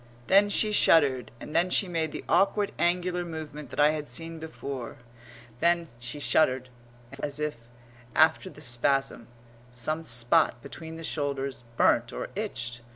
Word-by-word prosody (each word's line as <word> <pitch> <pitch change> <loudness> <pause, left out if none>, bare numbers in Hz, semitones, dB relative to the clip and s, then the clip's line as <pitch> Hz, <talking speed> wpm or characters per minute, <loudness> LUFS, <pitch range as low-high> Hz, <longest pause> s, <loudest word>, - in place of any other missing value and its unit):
Then 200 +5 +5
she 215 +1 +2
shuddered, 135 - +4
and 150 - -9
then 180 +2 +3
she 190 - +3
made 165 -3 -1
the - - -6
awkward 200 +4 +2
angular 180 0 +1
movement 155 -3 -7
that - - -7
I 150 +1 +6
had 150 -3 -5
seen 165 +6 -5
before, 140 -6 -6 0.6
as 130 -3 -1
if, 150 -3 -2 0.6
after 160 +4 +4
the 150 - -13
spasm, 135 -1 0 0.4
some 155 +7 -2
spot 120 -2 +2
between 160 +3 -8
the 165 - -8
shoulders 140 -4 -3
burnt 120 +1 +3
or - - -5
itched. 125 - -3
150 Hz, 135 wpm, -28 LUFS, 125-165 Hz, 0.6 s, I